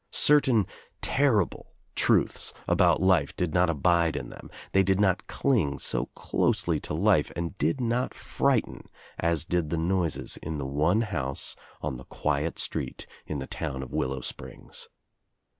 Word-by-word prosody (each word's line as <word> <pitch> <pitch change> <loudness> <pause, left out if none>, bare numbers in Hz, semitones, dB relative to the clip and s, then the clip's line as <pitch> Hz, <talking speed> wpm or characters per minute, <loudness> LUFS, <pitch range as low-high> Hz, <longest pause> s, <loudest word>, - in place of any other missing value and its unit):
Certain 130 -8 +4 0.4
terrible 125 - +1 0.2
truths - - +2
about - - +4
life 90 -7 +3
did 90 -4 -1
not 90 -1 +4
abide 85 +1 +2
in - - -4
them, - - -11 0.2
they 95 - +5
did 95 0 +2
not 95 -3 +2
cling 90 - +1
so - - -1
closely - - +1
to - - -4
life 90 -3 +3
and 85 +3 -3
did 140 - +1
not 120 +1 0
frighten - - -1 0.3
as 85 -2 +1
did 85 -3 0
the 85 - -1
noises 85 -1 0
in 80 0 -5
the 70 - -3
one 75 +10 +2
house 70 - -2 0.3
on 65 - -2
the 65 - -11
quiet 75 +2 -1
street - - -3 0.2
in 75 - -3
the 65 - -4
town 65 -2 -4
of 65 - -10
Willow 65 0 -1
Springs. - - -8
85 Hz, 155 wpm, -27 LUFS, 75-95 Hz, 0.4 s, they